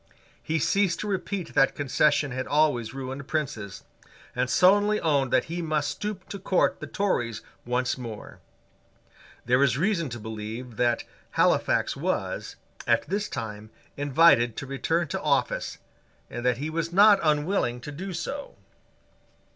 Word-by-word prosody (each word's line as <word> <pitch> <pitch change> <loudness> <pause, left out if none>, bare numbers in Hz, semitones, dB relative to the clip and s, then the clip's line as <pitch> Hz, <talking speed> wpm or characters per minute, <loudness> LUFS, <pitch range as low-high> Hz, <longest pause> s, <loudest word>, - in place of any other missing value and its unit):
He 160 - -1
ceased 190 +3 +1
to 210 - -4
repeat 195 -2 -3
that 135 - +3
concession 145 0 +2
had 130 +1 -3
always 145 -7 +2
ruined 135 +1 -6
princes, 115 - -3 0.5
and 125 0 0
sullenly 205 +3 +4
owned 140 -5 +1
that 130 - +4
he 170 +2 -4
must 155 -3 0
stoop 205 -3 -5
to 200 - -6
court 185 0 +1
the - - -6
Tories 120 - -1 0.2
once 125 +1 0
more. 115 -4 -8 1.1
There 125 +2 +3
is 135 -3 +3
reason 170 -2 0
to 120 0 -6
believe 110 +2 -7
that 120 -1 +1 0.3
Halifax - - +2
was, - - -3 0.3
at - - +2
this 205 +3 -1
time, 105 -1 -6 0.3
invited 140 -5 +4
to - - -4
return 160 +5 -1
to - - -3
office, - - 0 0.5
and 120 +1 -5
that 125 -1 +2
he 150 +4 -4
was 165 +1 -2
not 200 +2 +7
unwilling 150 -4 +1
to 150 - -7
do 185 +7 -6
so. 280 - -5
145 Hz, 145 wpm, -26 LUFS, 125-175 Hz, 1.1 s, not